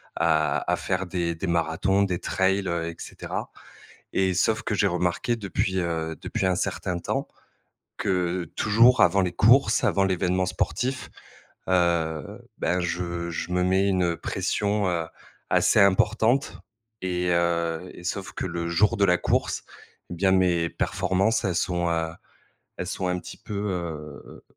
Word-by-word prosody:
à 80 -3 +1
à - - +3
faire 95 0 -2
des 85 -1 -1
des 90 +3 -4
marathons, 85 +4 +1
des 90 -3 -1
trails, 95 0 0
heu, 85 -1 -1
et 85 - -8
cetera. - - -6 0.6
Et 95 -1 +1
sauf 110 +5 +1
que - - -2
j'ai 100 - +2
remarqué 90 +6 0
depuis, 95 -3 -2
heu, 80 -2 -2
depuis 95 - -2
un 95 - +2
certain 90 0 -2
temps - - -2 0.7
que 90 -1 0
toujours 115 +4 +5
avant 100 +3 +4
les 90 -2 0
courses, 120 +7 +4
avant 100 - +3
l'évènement 90 0 +1
sportif 130 +7 -2 0.6
heu, 85 -4 0 0.2
ben 90 - 0
je 85 0 -3
je 85 +1 -4
me 90 0 +2
mets 95 +2 +2
une 90 -3 +1
pression, 105 +2 -1
heu, 85 -2 -1 0.4
assez - - +3
importante. 110 +6 +3 0.4
Et 90 -1 -1
heu 85 0 0
et - - -11
sauf 95 +1 -4
que - - -4
le 85 -1 -3
jour 95 +5 +2
de 100 - +3
la 90 -1 +3
course, - - 0 0.5
et - - -4
bien 95 +2 +2
mes 90 -3 +2
performances, 95 +4 0
elles 95 -3 0
sont, 85 -1 0
heu 80 -1 0 0.7
elles - - -3
sont 90 - -2
un 90 0 0
petit - - -10
peu, 105 - -8 0.2
heu 80 -5 -6
90 Hz, 155 wpm, -25 LUFS, 85-95 Hz, 0.7 s, toujours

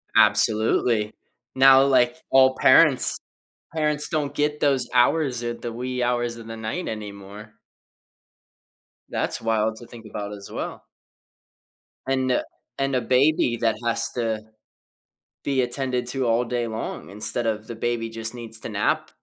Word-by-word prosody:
Absolutely, 110 0 +3 0.4
now, 135 0 +7
like, 130 -1 +3
all 130 0 +5
parents 135 +1 +5 0.6
parents 150 -1 +1
don't 150 -3 -1
get 150 +1 -1
those 135 -4 +2
hours 125 -1 +2
or 120 0 -2
the 120 0 -6
wee 125 +2 -4
hours 120 -1 -1
of 115 -1 -11
the 115 0 -7
night 110 +11 -4
anymore. 105 0 -8 1.6
That's - - -2
wild 110 -1 0
to 120 - -12
think 115 -2 -13
about 105 -1 -6
as 100 -1 -10
well. - - -6 1.2
And 130 -1 +1
a - - +1 0.3
and 135 0 -1
a 125 - +1
baby 130 0 +2
that 115 -1 +1
has 115 0 0
to 115 -3 -2 1.0
be 135 -2 +1
attended 125 0 -2
to 130 +1 -2
all 115 +2 +2
day 120 0 -2
long 110 0 -5
instead 105 +4 -2
of 110 -1 -2
the 115 - -6
baby 115 0 -2
just 115 0 -5
needs 115 -2 -7
to - - -7
nap - - 0
120 Hz, 145 wpm, -24 LUFS, 110-130 Hz, 1.6 s, now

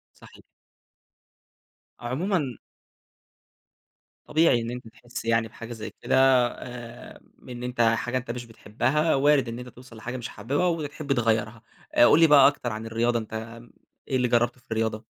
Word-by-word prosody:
صحيح. - - -17 1.6
عمومًا 140 +2 -1 1.7
طبيعي 155 -6 +3
إن 115 0 -4
أنت 125 -1 -7
تحس 120 +2 -9
يعني 115 0 +1
بحاجة 115 +2 -9
زي 110 -2 -7
كده، - - 0 0.4
آآ، 120 -2 -10 0.3
إن 125 -1 -7
أنت 125 -1 -5
حاجة 115 +2 +2
أنت 130 -1 -8
مش 120 +1 -4
بتحبها، 120 +8 0
وارد 140 -2 +3
إن 115 +1 -5
أنت 125 0 -8
توصل 125 -1 -14
لحاجة 125 +3 -6
مش 120 -2 -6
حاببها، 140 - -1
وتحب 155 -4 -2
تغيرها. 115 -2 0 0.3
آآ، 120 - +7
قُل 155 - +5
لي 165 - +8
بقى 145 -3 +7
أكتر 130 -4 0
عن 110 +1 -6
الرياضة 115 +1 0
أنت 110 +1 -7 0.5
إيه 130 - 0
اللي 125 -1 +1
جربته 120 +1 +1
في - - -35
الرياضة؟ 110 -1 -1
120 Hz, 155 wpm, -26 LUFS, 115-130 Hz, 1.7 s, لي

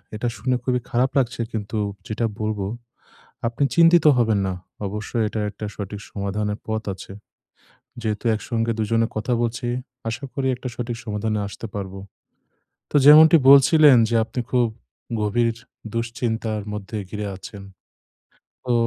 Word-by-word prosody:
এটা 115 +3 -2
শুনে 125 +5 0
খুবই 125 -1 +1
খারাপ 125 +3 +2
লাগছে। 120 -3 0
কিন্তু 110 0 -4 0.3
যেটা 110 +2 -1
বলবো 105 -2 -2 0.8
আপনি 115 +4 -1
চিন্তিত 170 -1 +6
হবেন 110 -4 +2
না। 95 - -2 0.3
অবশ্যই 105 +3 -2
এটা 110 - -4
একটা 105 - -7
সঠিক 100 0 -6
সমাধানের 105 +1 -2
পথ 110 0 -2
আছে। 95 - -11 0.9
যেহেতু 110 +1 -3
একসঙ্গে 115 +1 -2
দুজনে 115 +1 +1
কথা 110 +3 -1
বলছি, 120 +1 -2 0.4
আশা 115 +5 -5
করি 135 -1 -1
একটা 125 +1 -7
সঠিক 120 -1 -4
সমাধানে 105 0 -2
আসতে 100 - -8
পারবো। 95 -1 -5 0.9
তো - - +1
যেমনটি 155 +2 +9
বলছিলেন 140 0 +7
যে, 120 - -1
আপনি 125 - -4
খুব 125 -2 +3 0.5
গভীর 115 +2 +1 0.4
দুশ্চিন্তার 115 -2 -2
মধ্যে 105 +1 -6
ঘিরে 105 -1 -4
আছেন। 100 +1 -10 1.0
তো 125 - +1
115 Hz, 135 wpm, -23 LUFS, 105-125 Hz, 1.0 s, যেমনটি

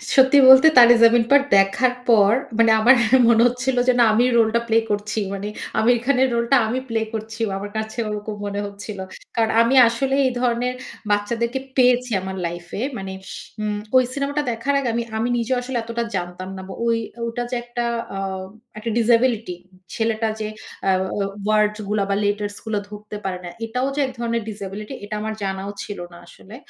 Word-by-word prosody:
সত্যি 265 +1 +6
বলতে, 265 +4 +9
Taare 240 0 +9
Zameen 230 0 +6
Par 285 0 +7 0.2
দেখার 195 +6 +2 0.2
পর 205 -3 +5 0.3
মানে 230 -1 +5
আমার 245 +5 +6 0.3
মনে 230 -1 +5
হচ্ছিল, 250 +1 -2
যে 255 - +5
না - - +7
আমি 235 - +3
রোল 225 -1 +4
টা 235 - +2
প্লে 225 0 +2
করছি। 210 +1 -2
মানে 200 +1 -5 0.3
আমির 240 +2 +3
খানের 265 -1 +3
রোলটা 235 +3 +2
আমি 245 +4 -1
প্লে 225 -1 -1
করছি। 220 +1 -6 0.2
আমার 205 +1 -7
কাছে 220 +2 -5
ওরকম 210 0 -5
মনে 200 0 -3
হচ্ছিল। 200 0 -8 0.4
কারণ 225 -1 +1
আমি 235 +3 +2
আসলে 265 +4 -1
এই - - -1
ধরনের 245 0 0 0.4
বাচ্চাদেরকে 235 +5 -1 0.2
পেয়েছি 250 -1 +3
আমার 190 0 -6
লাইফ 175 +1 -5
এ। - - -2 0.2
মানে 190 -1 -6 0.5
উম 210 -1 -2 0.2
ওই 255 - +6
সিনেমাটা 280 +2 -2
দেখার 235 +5 -2
আগে 265 -3 -2
আমি 235 +1 -1
আমি 230 +2 -1
নিজেও 240 +2 -1
আসলে 250 0 -4
এতটা 230 +1 -3
জানতাম 180 +1 -5
না। - - -7 0.2
ওই 230 0 +2 0.3
ওটা 235 +1 -3
যে - - -1
একটা 240 0 -4 0.3
আ - - -4 0.6
একটা 220 +2 -4
ডিসেবিলিটি 230 -4 +2 0.4
ছেলেটা 225 -1 -1
যে 215 - -3 0.4
আ - - +4
আ - - +5 0.6
ওয়ারডস 210 0 +2
গুলা, 210 -1 0
বা 200 - +1
লেটার্স 205 0 -2
গুলা 215 -2 -1
ধরতে 210 0 -9
পারে 190 -1 -3
না। - - -6 0.2
এটাও 250 +4 -2
যে - - -2
এক 260 - -5
ধরনের 235 -1 -1
ডিসেবিলিটি 205 +2 -7
এটা 205 +1 -5
আমার 220 0 -3
জানাও 195 +1 -4
ছিল 205 - -7
না - - -12
আসলে। 200 +5 -14
225 Hz, 185 wpm, -21 LUFS, 205-245 Hz, 0.6 s, বলতে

